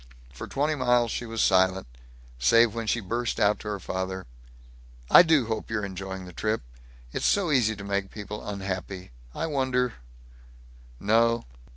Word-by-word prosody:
For 65 - -7
twenty 150 +3 0
miles 125 -4 +2
she 120 - -4
was 115 0 -1
silent, 95 0 +3 0.5
save 115 - +5
when 115 -1 -4
she 120 +2 +1
burst 115 +4 -2
out 105 +1 +3
to - - -9
her 105 -1 -3
father, 95 0 -4 0.9
"I - - +11
do 160 -7 +3
hope 110 -1 -4
you're 110 -2 -1
enjoying 95 -1 -6
the 90 - -11
trip. 110 +5 -1 0.5
It's - - -3
so 190 -6 +2
easy 115 -6 +3
to 100 - -9
make 100 -1 -2
people 105 0 -7
unhappy. 95 -2 -5 0.2
I - - -2
wonder 130 -5 0 1.1
No. 115 +2 +2
110 Hz, 160 wpm, -26 LUFS, 95-120 Hz, 1.1 s, I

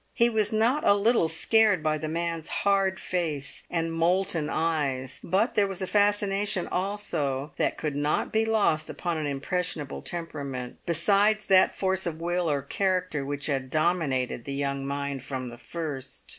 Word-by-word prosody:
He 235 0 +4
was 215 -2 +1
not 230 +7 +2
a 200 - +5
little 210 -3 +3
scared 205 +2 +3
by 155 -1 +1
the 155 - -3
man's 165 0 -3
hard 195 -1 +1
face 155 -6 -3
and 165 -1 -1
molten 170 -1 +2
eyes; 145 -5 -1
but 195 +7 +1
there 205 -1 +3
was 195 -1 -5
a 190 - -1
fascination 205 -1 +1
also 165 -8 -2
that - - 0
could 150 -3 -3
not 145 +1 0
be 220 0 +3
lost 210 -9 +1
upon 170 -3 -3
an 150 - -2
impressionable 145 +1 -3
temperament, 140 -7 -5
besides 200 +5 +3
that 190 -1 +5
force 190 -1 0
of 160 -1 -4
will 175 0 0
or 140 -2 0
character 185 -2 -1
which 145 +1 -3
had 135 -3 -1
dominated 150 -7 0
the 140 - -4
young 140 -1 -2
mind 140 -1 -3
from 130 -1 -5
the 120 - -10
first. 145 -5 -6
165 Hz, 165 wpm, -27 LUFS, 145-195 Hz, -, a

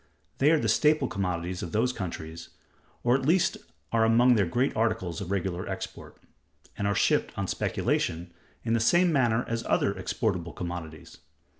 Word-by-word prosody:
They 140 - +5
are 160 - +5
the - - -1
staple 150 -3 +3
commodities 90 -3 -3
of 85 - -6
those 125 +4 +1
countries, 85 -5 -6 0.5
or 120 - +3
at 135 - -1
least 165 +6 +3 0.4
are 115 -1 +3
among 120 +3 +5
their 100 -6 +2
great 125 +10 0
articles 105 -5 -1
of 95 - -5
regular 95 -2 -2
export; - - -7 0.6
and 100 - -1
are 100 - +1
shipped - - +1
on - - -1
speculation, 85 +1 -1 0.3
in 115 - 0
the 115 - +3
same 175 +9 +4
manner 120 -4 +2
as 115 0 -2
other - - +1
exportable 90 -6 -2
commodities. 85 -3 -7
110 Hz, 165 wpm, -27 LUFS, 90-125 Hz, 0.6 s, They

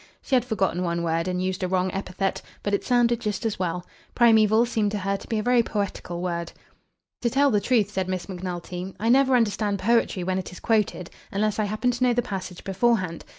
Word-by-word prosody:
She - - -6
had 250 - +3
forgotten 190 -7 0
one 170 -1 -1
word 165 +1 0
and 180 0 -1
used 185 0 -2
a 185 - 0
wrong 185 0 0
epithet; 195 0 -2 0.2
but 205 - -1
it 200 - +1
sounded 240 -1 +2
just 210 +1 -3
as 220 -4 -1
well. 180 -1 -2 0.3
Primeval 220 -1 +5
seemed 220 -3 0
to - - 0
her 195 0 -1
to - - -8
be 225 - -1
a 215 - -1
very 245 0 +4
poetical 200 -5 -3
word. 170 -2 -3 0.7
"To 235 - +1
tell 280 +3 +3
the 205 -2 +2
truth," 215 -3 +2
said 190 -2 -2
Miss 185 -1 -3
Macnulty, 180 0 -5
"I 225 +3 0
never 265 +1 +5
understand 210 -3 +1
poetry 210 -2 +1
when 185 +1 0
it 185 - -6
is 180 - -10
quoted 210 -5 0 0.2
unless 215 +1 0
I 215 - +2
happen 215 +5 0
to 245 +1 -2
know 250 -1 +4
the 245 - +1
passage 185 -3 -6
beforehand. 195 -3 0
200 Hz, 220 wpm, -25 LUFS, 185-230 Hz, 0.7 s, Primeval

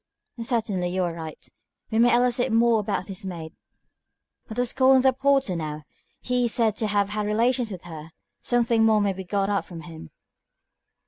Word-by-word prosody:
"Certainly, 220 -6 -1
you 185 +1 -1
are 175 -1 -2
right. 160 -2 -8 0.4
We 220 - +1
may 240 0 +5
elicit 245 0 +1
more 230 0 +4
about 200 -2 -2
this 195 -1 -6
maid. 170 -4 -7 1.0
Let 220 - -7
us 245 -1 0
call 265 0 +5
in 260 - +4
the 265 -1 +4
porter 270 -6 +1
now. 155 -2 -5 0.4
He 250 -1 0
is 235 - +3
said 225 -4 +2
to 220 - -1
have 205 -1 +1
had 210 0 -2
relations 235 +2 +1
with 185 -3 -8
her. 160 -2 -9 0.3
Something 235 -2 +2
more 220 -1 +4
may 200 -1 +1
be 190 0 -7
got 195 +2 -1
out 200 - -2
of 170 -2 -9
him." 160 - -11
210 Hz, 190 wpm, -25 LUFS, 180-240 Hz, 1.0 s, may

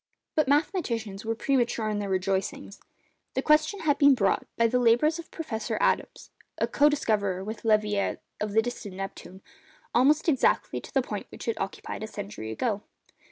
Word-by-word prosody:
But 310 -3 +2
mathematicians 235 - 0
were 225 0 -1
premature 240 -2 0
in 210 -1 -1
their 200 -1 -3
rejoicings. 190 +1 -2 0.6
The - - 0
question 310 +6 +3
has 295 -3 +2
been 280 -1 +6
brought, 200 -5 +1
by 230 - +4
the 250 +2 +2
labours 250 +8 +3
of 335 - -9
Professor 225 -10 -4
Adams—co 290 +1 0
discoverer 205 -9 0
with 220 +3 -6
Leverrier 210 -2 +2 0.2
of 210 -1 -3
the 220 +1 +4
distant 220 -5 -6
Neptune—almost 215 - -2
exactly 275 -6 +2
to - - -12
the 270 - +2
point 210 -4 -5
which - - -10
it 230 - -1
occupied 195 +2 -5
a 220 - -4
century 200 - -7
ago. 205 - -1
225 Hz, 160 wpm, -27 LUFS, 200-275 Hz, 0.6 s, been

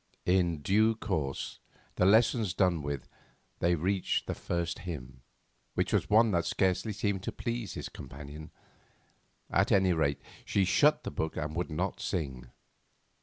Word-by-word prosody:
In 85 -4 +2
due 110 +5 +3
course, 80 -12 -3 0.3
the 90 - +3
lessons 110 -2 +4
done 90 -4 +2
with, 70 -3 -4 0.5
they 85 0 +3
reached 95 +4 0
the - - -2
first 85 -1 -3
hymn, 65 -7 -7 0.5
which - - 0
was - - +1
one 110 +1 +5
that 85 -2 +2
scarcely 95 +3 +1
seemed 100 -2 -1
to - - -3
please 120 -2 -4
his - - -4
companion; 75 +4 -9 1.0
at - - +3
any 95 -2 +4
rate, 70 -4 +1 0.2
she 100 - +1
shut 150 +11 +4
the - - -4
book 80 +2 -3
and 75 +1 -3
would 90 +1 -2
not 90 +5 -2
sing. 65 -11 -3
90 Hz, 150 wpm, -30 LUFS, 75-100 Hz, 1.0 s, one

